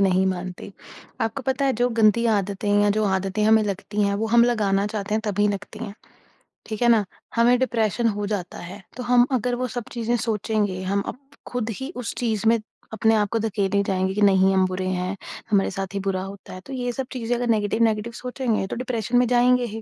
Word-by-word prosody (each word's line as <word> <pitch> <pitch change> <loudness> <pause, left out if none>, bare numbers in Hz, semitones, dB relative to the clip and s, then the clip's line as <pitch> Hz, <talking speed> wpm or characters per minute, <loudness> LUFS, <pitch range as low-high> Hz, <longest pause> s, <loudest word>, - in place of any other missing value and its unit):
नहीं 190 -1 +3
मानती। 185 +1 -4 0.5
आपको 225 +4 -2
पता 265 +1 0
है 270 - +3
जो 245 - +4
गंदी 220 +2 +4
आदतें 200 0 -2
हैं 205 0 +4
या 205 - +3
जो 215 - +2
आदतें 195 +1 0
हमें 220 0 +5
लगती 205 +1 -2
हैं 200 0 +1
वो - - +1
हम 235 +1 +5
लगाना 205 -4 +1
चाहते 210 -1 -3
हैं 220 - +1
तभी 205 0 +1
लगती 205 +1 -5
हैं, 215 -3 -6 0.7
ठीक 220 +1 -6
है 240 - +4
ना? 225 -3 +5 0.3
हमें 240 +2 +5
डिप्रेशन 235 -2 +1
हो 205 - -2
जाता 180 -3 -4
है, 195 +2 -9 0.2
तो 250 - -4
हम 245 0 +5
अगर 245 +2 -1
वो 255 - 0
सब 245 - -2
चीजें 235 0 -1
सोचेंगे, 210 -3 -1
हम 200 +2 0
अप - - -21 0.3
ख़ुद 245 -2 -2
ही 265 +4 -5
उस 225 - -3
चीज़ 220 -3 0
में 230 0 +4 0.3
अपने 220 +1 +3
आप 210 -1 +1
को 230 - +1
धकेले 200 -2 0
जाएँगे 190 0 0
कि 210 - -2
नहीं 195 -1 +5
हम 190 -1 +4
बुरे 185 0 -3
हैं, 185 +1 -2 0.4
हमारे 195 -2 +3
साथ 195 0 -5
ही 200 - -1
बुरा 185 -1 -1
होता 195 0 -9
है, 185 - -8
तो 270 - -8
ये 245 -1 -2
सब 260 +1 -4
चीजें 245 -1 -1
अगर 245 0 -2
नेगेटिव-नेगेटिव 220 +1 +1
सोचेंगे 250 -4 -1
तो - - -4
डिप्रेशन 245 -1 -1
में 245 0 +4
जाएँगे 250 +1 +4
ही। 225 - -5
215 Hz, 220 wpm, -23 LUFS, 195-235 Hz, 0.7 s, हमें